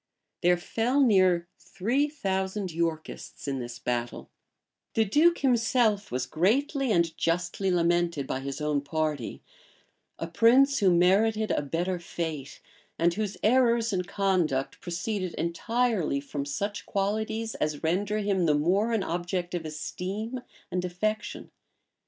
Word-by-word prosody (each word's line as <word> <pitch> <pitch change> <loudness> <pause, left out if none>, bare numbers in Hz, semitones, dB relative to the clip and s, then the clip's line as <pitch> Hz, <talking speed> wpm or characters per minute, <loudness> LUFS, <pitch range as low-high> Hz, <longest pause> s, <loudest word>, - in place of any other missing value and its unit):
[*] - - -57
There 175 0 +4
fell 230 +9 0
near 185 -8 +4
three 215 +10 0
thousand 190 - -2
Yorkists 160 -3 -4
in 135 -1 -1
this 120 -1 -6
battle: 120 -1 -3 0.6
the 225 - +3
duke 320 - +4
himself 235 -5 +2
was 125 0 -1
greatly 260 - +1
and 170 -4 +2
justly 180 +3 0
lamented 175 -4 +1
by 130 - -3
his 135 +1 -5
own 150 -1 0
party; 150 -3 -3 0.7
a - - -3
prince 250 +10 +4
who 195 -4 +4
merited 210 +5 +3
a - - +1
better 175 +5 -2
fate, 160 -5 -5 0.4
and 170 +1 +3
whose 205 +1 -3
errors 235 -1 +3
in 185 - +1
conduct 180 -8 0
proceeded 185 +1 -3
entirely 195 - 0
from 140 0 -5
such 200 +8 -3
qualities 220 +3 -1
as 150 0 -2
render 195 +6 0
him 200 -4 +1
the 150 - +4
more 190 +10 +2
an 220 -4 +1
object 175 +1 -3
of 170 -2 -3
esteem 200 +10 -4 0.3
and 180 0 -1
affection. 215 +5 -3
185 Hz, 135 wpm, -28 LUFS, 165-220 Hz, 0.7 s, There